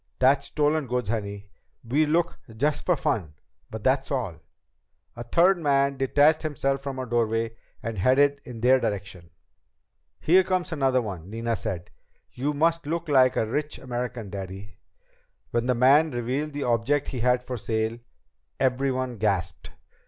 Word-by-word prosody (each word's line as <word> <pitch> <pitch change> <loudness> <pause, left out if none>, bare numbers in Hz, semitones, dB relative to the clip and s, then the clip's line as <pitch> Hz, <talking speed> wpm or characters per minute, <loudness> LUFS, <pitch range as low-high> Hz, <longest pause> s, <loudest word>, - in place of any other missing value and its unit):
That's 135 +2 +3
stolen 150 -1 +1
goods, 125 -3 -2
honey. 100 -3 -4 0.4
We 150 +6 +2
look 170 +2 0 0.2
just 145 +4 0
for 180 - +4
fun. 110 - -2 0.3
But 110 -1 -7
that's 135 +1 +1
all." 115 - -3 0.8
A 120 - -7
third 175 +9 +3
man 140 -3 +2
detached 145 +4 +3
himself 135 -3 -1
from 135 -1 -5
a 130 - -3
doorway 115 -1 0 0.3
and 115 -3 -4
headed 140 +6 +3
in 115 -2 -9
their 130 +2 +5
direction. 95 -6 -4 0.9
"Here 185 +4 +5
comes 185 -1 -1
another 135 -5 +1
one," 95 -4 -7
Nina 115 +1 -2
said. 90 -4 -5 0.4
"You 145 +4 -2
must 165 +1 +1
look 165 +1 -3
like 130 -3 +5
a - - +1
rich 150 +7 -3
American, 120 -4 -5
Daddy." 95 0 -8 0.7
When 120 +1 0
the 125 - +2
man 140 +6 +5
revealed 130 +4 -3
the 145 0 -3
object 125 +5 +1
he 130 - -4
had 125 +1 +2
for 125 - -5
sale, 110 +2 -2 0.6
everyone 130 -1 0
gasped. 95 -5 -1
130 Hz, 150 wpm, -26 LUFS, 115-145 Hz, 0.9 s, their